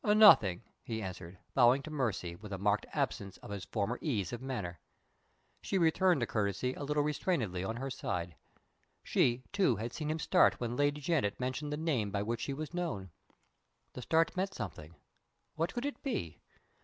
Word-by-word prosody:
"Nothing," 210 - +7 0.2
he 110 -2 -4
answered, 90 -1 -7 0.2
bowing 130 +2 +5
to 155 - -7
Mercy, 105 - -1
with 105 +3 -11
a 95 - -2
marked 100 +2 +1
absence 100 -2 -2
of - - -11
his 100 -2 -5
former 115 +5 -2
ease 105 - -1
of 120 - -5
manner. 105 -10 -4 0.8
She 195 - -1
returned 175 -3 +3
the - - +2
courtesy 105 +3 -1
a - - -9
little 145 +1 +1
restrainedly 140 - -1
on 110 +4 -2
her 135 +3 -4
side. 90 - -3 0.7
She, 120 +1 +2
too, 190 - +3
had 115 +3 -4
seen 150 -2 -3
him 155 - 0
start 160 - +4
when 120 0 -2
Lady 145 +2 +1
Janet 140 -10 0
mentioned 130 +4 -2
the 150 - -1
name 145 -10 0
by 100 0 -1
which 115 +2 -2
she 140 - -2
was 155 +3 -5
known. 155 - -3 0.8
The 125 - -7
start 160 +7 +2
meant 190 +1 -1
something. 85 -6 -7 0.6
What 165 +2 -1
could 245 +2 -3
it 285 - -4
be? 85 - -3
125 Hz, 180 wpm, -33 LUFS, 100-155 Hz, 0.8 s, Nothing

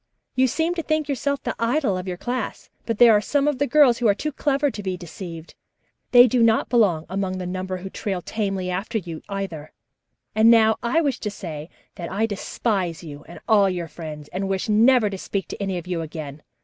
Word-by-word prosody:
"You 260 0 +3
seem 325 +7 0
to 345 - -3
think 310 -1 -1
yourself 280 0 -2
the - - -2
idol 235 -2 +1
of 185 +1 -5
your 180 -1 -4
class, 245 +2 -4 0.2
but 230 -2 -1
there 240 0 +8
are 210 - +4
some 285 +6 +1
of 290 -4 0
the 285 - +1
girls 260 -3 +5
who 240 - +2
are 200 - +4
too 305 +8 -3
clever 285 0 0
to 215 - -7
be 190 -2 -3
deceived. 170 -1 -9 0.6
They 245 -1 +8
do 245 +1 +1
not 225 -1 +3
belong 200 -10 +2
among 190 0 -2
the 185 - -4
number 185 +1 -4
who 190 +1 -7
trail 195 -3 -3
tamely 195 -4 -2
after 200 +5 -2
you, 170 -5 -6
either. 190 -7 -5 0.6
And 220 +1 +5
now 220 -1 +5
I 245 +8 +2
wish 280 -6 -1
to 210 - -3
say 160 -5 -7 0.3
that 170 -1 -6
I 205 +4 +1
despise 195 -4 -2
you 145 -2 -9
and 170 - -11
all 205 -3 +5
your 175 -2 -3
friends, 155 -2 -8
and 195 +2 -3
wish 190 -1 -1
never 225 +2 +5
to 195 -2 -5
speak 195 0 -3
to - - -7
any 195 -2 -1
of 175 - -6
you 180 -2 -2
again. 155 -2 -7
200 Hz, 220 wpm, -23 LUFS, 180-240 Hz, 0.6 s, there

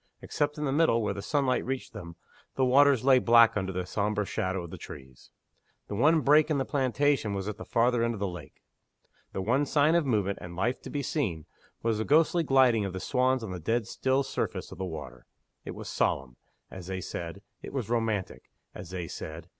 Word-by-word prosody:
Except 145 0 -2
in 150 - -2
the 135 - 0
middle, 140 -6 +3
where 105 - -1
the 100 - -6
sunlight 135 0 0
reached 130 -1 -4
them, 85 -6 -9 0.4
the 130 - +2
waters 135 -1 +4
lay 130 -2 +6
black 115 -1 +6
under 95 -2 -2
the 90 -1 -3
sombre 105 +2 -1
shadow 95 -1 -2
of 85 - -9
the - - -7
trees. 65 -2 -12 0.6
The - - -4
one 150 +9 +3
break 150 +2 +4
in 150 - +1
the 135 - -1
plantation 135 -5 +1
was 95 0 -4
at 105 - -4
the - - -8
farther 120 0 +2
end 115 0 0
of - - -8
the 100 - -1
lake. 90 -6 -10 0.7
The 95 - -4
one 125 +8 +2
sign 150 +3 +3
of 170 -4 +2
movement 100 -5 0
and 85 0 -8
life 115 +8 -1
to - - -9
be 145 -1 -3
seen 95 - -2 0.4
was 115 -2 0
the - - 0
ghostly 160 +6 +3
gliding 130 -7 +4
of 100 -2 -4
the 95 - -4
swans 130 +2 +1
on 105 - -5
the 90 - -5
dead 115 +7 0
still 130 +5 0
surface - - -4
of - - -10
the 95 - -2
water. 80 -6 -8 0.4
It - - -6
was - - -8
solemn 65 -2 -1 0.4
as 90 -2 -9
they 95 -1 -3
said; 85 +2 -6 0.2
it - - -8
was 130 -6 -3
romantic 115 -4 -2 0.2
as - - -9
they 90 -2 -5
said. 80 +2 -8
115 Hz, 215 wpm, -28 LUFS, 95-135 Hz, 0.7 s, lay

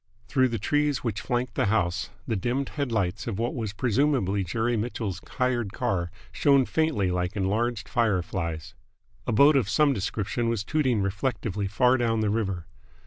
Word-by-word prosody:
Through 130 -1 +3
the 115 -2 -2
trees 145 +4 0
which 110 -4 -2
flanked 125 -1 -1
the 130 -4 +1
house 95 -5 0 0.2
the 110 - 0
dimmed 125 +7 -1
headlights 110 -8 -2
of 110 -5 -2
what 120 +2 -1
was 110 -5 -3
presumably 115 -3 +1
Jerry 115 +6 0
Mitchell's 110 -4 -3
hired 120 -5 -1
car 85 -3 -1 0.2
shone 140 -2 +4
faintly 150 - +1
like 90 +2 -1
enlarged 105 +3 0
fire 110 -7 +1
flies. 80 -5 -4 0.5
A - - +1
boat 140 +7 +6
of 120 -7 +2
some 150 +1 +4
description 110 +2 -2
was 115 -3 -1
tooting 130 -7 +1
reflectively 100 0 -2
far 125 +5 +3
down 115 -2 +1
the 105 -1 +1
river. 100 -6 -1
115 Hz, 165 wpm, -26 LUFS, 100-125 Hz, 0.5 s, boat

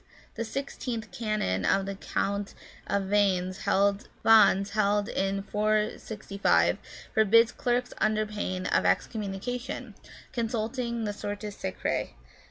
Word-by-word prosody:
The - - -3
sixteenth 230 -3 -4
canon 195 - -1
of 195 - +2
the 195 - -3
Council 200 +1 -2 0.3
of 200 -1 +1
Vannes, 190 -2 +1
held 200 +1 +1 1.0
in 195 -1 -1
465, 210 -1 +1 0.4
forbids 225 +1 +5
clerks 245 0 -1
under 215 0 +2
pain 185 -3 -3
of - - +2
excommunication, 230 +3 -2 0.4
consulting 235 0 -2
the 205 -1 -2
Sortes 205 0 -5
Sacrae. 95 - -3
210 Hz, 100 wpm, -28 LUFS, 195-230 Hz, 1.0 s, forbids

